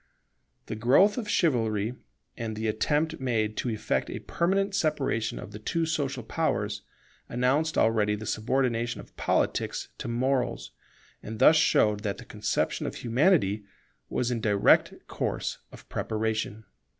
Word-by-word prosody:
The -, -, -5 dB
growth 135 Hz, -, +4 dB
of 215 Hz, -3 st, -5 dB
Chivalry, 115 Hz, -, +1 dB, 0.4 s
and 115 Hz, -1 st, -4 dB
the 110 Hz, +1 st, -2 dB
attempt 150 Hz, +9 st, 0 dB
made 110 Hz, -5 st, 0 dB
to 125 Hz, -, -1 dB
effect 110 Hz, -2 st, -1 dB
a -, -, -4 dB
permanent 195 Hz, +3 st, 0 dB
separation 140 Hz, -, 0 dB
of 95 Hz, -, -8 dB
the 105 Hz, -, -8 dB
two 165 Hz, +9 st, -1 dB
social 140 Hz, -5 st, -2 dB
powers, 105 Hz, -7 st, -1 dB, 0.5 s
announced 135 Hz, +6 st, +1 dB
already 105 Hz, -2 st, +3 dB
the 105 Hz, +1 st, -7 dB
subordination 120 Hz, +1 st, 0 dB
of -, -, -13 dB
Politics -, -, 0 dB
to -, -, -5 dB
Morals, 125 Hz, +2 st, -1 dB, 0.5 s
and 110 Hz, +1 st, -7 dB
thus 155 Hz, -, +7 dB
showed 105 Hz, -9 st, +3 dB
that 100 Hz, -2 st, -3 dB
the -, -, -10 dB
conception -, -, -1 dB
of -, -, -5 dB
Humanity 120 Hz, -, +2 dB, 0.5 s
was 125 Hz, 0 st, -1 dB
in 115 Hz, -2 st, -1 dB
direct 105 Hz, -2 st, +4 dB
course -, -, -3 dB
of -, -, -14 dB
preparation. 110 Hz, -1 st, -2 dB
120 Hz, 140 wpm, -28 LUFS, 110-145 Hz, 0.5 s, thus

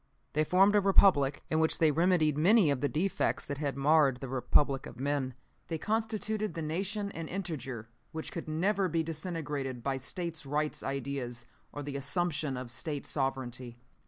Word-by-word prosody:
"They 155 Hz, -, +2 dB
formed 195 Hz, +6 st, +4 dB
a 205 Hz, -, +5 dB
Republic, 180 Hz, -8 st, +4 dB
in 160 Hz, -, +2 dB
which 160 Hz, 0 st, +2 dB
they 160 Hz, -2 st, +4 dB
remedied 165 Hz, -2 st, +3 dB
many 180 Hz, +2 st, +5 dB
of 140 Hz, -, -1 dB
the 145 Hz, -, +1 dB
defects 180 Hz, +6 st, 0 dB
that 140 Hz, 0 st, -5 dB
had 140 Hz, -3 st, -2 dB
marred 140 Hz, -2 st, +4 dB
the 135 Hz, -, -6 dB
Republic 135 Hz, +2 st, +2 dB
of 120 Hz, -, -11 dB
men. 135 Hz, -2 st, -1 dB, 0.3 s
They 165 Hz, -, -2 dB
constituted 215 Hz, +1 st, -1 dB
the 165 Hz, -, -3 dB
Nation 200 Hz, +6 st, -1 dB
an 165 Hz, -3 st, -6 dB
integer 140 Hz, -, -5 dB, 0.2 s
which 160 Hz, 0 st, -6 dB
could 170 Hz, -, -6 dB
never 190 Hz, +5 st, +1 dB
be 165 Hz, 0 st, +1 dB
disintegrated 150 Hz, -6 st, -4 dB
by 135 Hz, -1 st, -1 dB
States' 165 Hz, +5 st, -4 dB
Rights 150 Hz, +2 st, -1 dB
ideas 135 Hz, -3 st, -4 dB, 0.3 s
or 145 Hz, -, -6 dB
the 140 Hz, 0 st, -4 dB
assumption 150 Hz, -1 st, 0 dB
of 125 Hz, -2 st, -6 dB
State 145 Hz, +3 st, -4 dB
sovereignty. 130 Hz, -3 st, -2 dB
150 Hz, 170 wpm, -31 LUFS, 135-175 Hz, 0.3 s, a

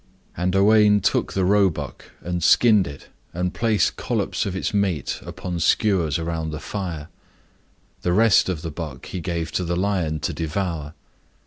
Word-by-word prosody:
And 90 Hz, +2 st, -1 dB
Owain 105 Hz, +1 st, +5 dB
took -, -, 0 dB
the 95 Hz, -1 st, +1 dB
roebuck, 95 Hz, -8 st, +1 dB, 0.2 s
and 90 Hz, -1 st, -3 dB
skinned 105 Hz, -1 st, +5 dB
it, 70 Hz, -1 st, -10 dB, 0.3 s
and 90 Hz, +1 st, -1 dB
placed 115 Hz, -3 st, +1 dB
collops -, -, -1 dB
of 95 Hz, -, -4 dB
its 95 Hz, -, -1 dB
flesh 95 Hz, -9 st, -1 dB
upon 90 Hz, -2 st, -5 dB
skewers 85 Hz, -3 st, +2 dB
round 80 Hz, -1 st, -3 dB
the 75 Hz, -, -5 dB
fire. 85 Hz, -7 st, -5 dB, 0.9 s
The 90 Hz, -, 0 dB
rest 105 Hz, 0 st, +4 dB
of 85 Hz, -4 st, -3 dB
the 80 Hz, -, -4 dB
buck 75 Hz, -5 st, -7 dB
he 90 Hz, -, -5 dB
gave 85 Hz, -1 st, -3 dB
to 90 Hz, -, -1 dB
the 85 Hz, 0 st, -1 dB
lion 90 Hz, -5 st, 0 dB
to 85 Hz, -, -2 dB
devour. 80 Hz, -1 st, -3 dB
90 Hz, 160 wpm, -23 LUFS, 80-100 Hz, 0.9 s, Owain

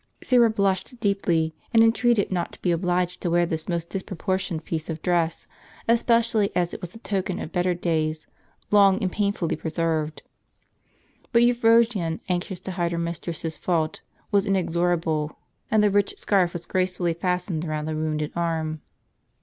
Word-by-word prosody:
Syra 240 Hz, -2 st, +5 dB
blushed 200 Hz, +3 st, -1 dB
deeply, 175 Hz, -6 st, +1 dB, 0.2 s
and 225 Hz, 0 st, +6 dB
entreated 225 Hz, -2 st, +3 dB
not 175 Hz, -2 st, -1 dB
to -, -, -13 dB
be 180 Hz, -, +2 dB
obliged 180 Hz, +1 st, 0 dB
to 175 Hz, -, -1 dB
wear 175 Hz, +1 st, +3 dB
this 160 Hz, 0 st, -4 dB
most 170 Hz, -1 st, -2 dB
dis 195 Hz, -, -2 dB
proportioned 185 Hz, -4 st, -3 dB
piece 160 Hz, -1 st, -4 dB
of 160 Hz, -1 st, -3 dB
dress, 170 Hz, -2 st, 0 dB, 0.4 s
especially 230 Hz, -2 st, +3 dB
as 175 Hz, -1 st, +1 dB
it -, -, -7 dB
was 180 Hz, +2 st, -8 dB
a -, -, -7 dB
token 195 Hz, -4 st, -2 dB
of 160 Hz, -, -6 dB
better 180 Hz, 0 st, +1 dB
days, 155 Hz, -3 st, -1 dB, 0.5 s
long 200 Hz, -2 st, +6 dB
and 185 Hz, -, 0 dB
painfully 200 Hz, -5 st, 0 dB
preserved. 160 Hz, -1 st, -2 dB, 1.1 s
But 235 Hz, -1 st, +5 dB
Euphrosyne, 230 Hz, -7 st, +3 dB
anxious 180 Hz, +1 st, -2 dB
to 190 Hz, -, -5 dB
hide 175 Hz, -1 st, -1 dB
her -, -, -2 dB
mistress's 170 Hz, -1 st, -4 dB
fault, 160 Hz, -3 st, -1 dB, 0.3 s
was 200 Hz, 0 st, +2 dB
inexorable; 170 Hz, -4 st, 0 dB, 0.3 s
and 215 Hz, -1 st, +3 dB
the 205 Hz, -, +4 dB
ricli 205 Hz, 0 st, +1 dB
scarf 185 Hz, -4 st, +2 dB
was 175 Hz, -1 st, -6 dB
gracefully 180 Hz, -2 st, 0 dB
fastened 180 Hz, -1 st, -2 dB
round 155 Hz, -2 st, -3 dB
the 155 Hz, -, -2 dB
wounded 155 Hz, -1 st, -2 dB
arm. 160 Hz, -2 st, -2 dB
175 Hz, 160 wpm, -25 LUFS, 165-200 Hz, 1.1 s, and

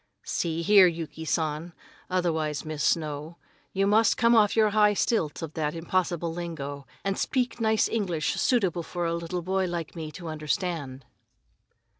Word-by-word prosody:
"See 165 Hz, -1 st, -1 dB
here, 200 Hz, 0 st, +7 dB
Yuki 165 Hz, -1 st, -5 dB
San, 160 Hz, +2 st, -1 dB, 0.4 s
otherwise 160 Hz, -6 st, -1 dB
Miss 155 Hz, -1 st, -3 dB
Snow, 155 Hz, +1 st, -1 dB, 0.3 s
you 195 Hz, +1 st, +1 dB
just 220 Hz, +2 st, +4 dB
come 235 Hz, 0 st, +4 dB
off 210 Hz, -2 st, +4 dB
your 215 Hz, -2 st, +4 dB
high 210 Hz, -1 st, +4 dB
stilts 165 Hz, -9 st, 0 dB
of 160 Hz, -1 st, -6 dB
that 150 Hz, -1 st, -2 dB
impossible 170 Hz, 0 st, -1 dB
lingo, 145 Hz, -5 st, -6 dB, 0.2 s
and 195 Hz, 0 st, -1 dB
speak 245 Hz, -3 st, -1 dB
nice 220 Hz, -1 st, +3 dB
English 180 Hz, -8 st, -1 dB
suitable 190 Hz, -9 st, +1 dB
for 175 Hz, +1 st, -4 dB
a 165 Hz, -, 0 dB
little 170 Hz, +1 st, -3 dB
boy 190 Hz, +1 st, 0 dB
like 170 Hz, -2 st, -4 dB
me 160 Hz, -2 st, -5 dB
to 170 Hz, -, -8 dB
understand." 155 Hz, -4 st, -3 dB
170 Hz, 155 wpm, -27 LUFS, 155-195 Hz, 0.4 s, here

